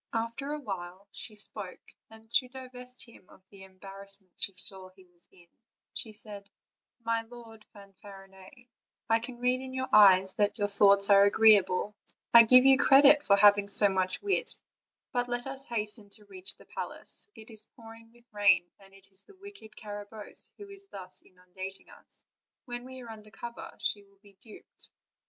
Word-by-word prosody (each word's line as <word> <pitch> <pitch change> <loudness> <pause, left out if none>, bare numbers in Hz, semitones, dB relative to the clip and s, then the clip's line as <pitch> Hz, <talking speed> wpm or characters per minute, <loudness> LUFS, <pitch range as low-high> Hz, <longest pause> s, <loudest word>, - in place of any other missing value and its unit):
After 230 +5 -3
awhile 195 -9 -7
she 215 - -5
spoke, 205 -2 -6 0.2
and 220 0 -17
to 255 +1 +1
divest 250 -1 -3
him 225 -5 -19
of 185 - -20
the 200 -1 -15
embarrassment 195 0 -8
she - - +1
saw 190 0 0
that 185 - -23
he 190 -1 -19
was 175 -1 -23
in, 175 -2 -21 0.5
she 220 - -5
said: 205 -2 -6 0.6
''My 230 0 -2
Lord 230 -3 -14
Fanfarinet, 195 +3 -16 0.4
I 225 - +4
can 240 +1 -8
read 250 +1 0
in 260 0 -8
your 260 0 -3
eyes 190 -2 +6
that 205 0 +1
your 205 0 -1
thoughts 200 0 +4
are 200 0 +7
agreeable; 205 -1 +3 0.4
I 235 - +11
give 255 +3 +7
you 270 0 +6
credit 285 +1 +7
for 200 -9 +3
having 205 0 +5
so 205 0 +3
much 185 - -2
wit; 400 -1 +1 0.5
but 245 -1 -2
let 240 0 -3
us 270 0 -4
hasten 215 -2 -2
to 210 - -19
reach 190 -2 -2
the - - -18
palace; - - -4
it 220 +1 -13
is 215 -1 -2
pouring 225 -2 -15
with 240 0 -24
rain, 205 -4 +3
and 195 0 -19
it 195 0 -19
is 190 +1 -13
the 405 - -19
wicked 400 - -13
Carabosse 205 0 -6
who 410 - -11
is 395 0 -12
thus 185 - -5
inundating 185 +1 -10
us; - - -20 0.4
when 245 0 -7
we 260 0 -10
are 230 - -10
under 215 -1 -13
cover 235 +2 -9
she 205 - -1
will 200 0 -26
be 200 -1 -19
duped." 220 -4 -17
210 Hz, 180 wpm, -29 LUFS, 195-240 Hz, 0.6 s, I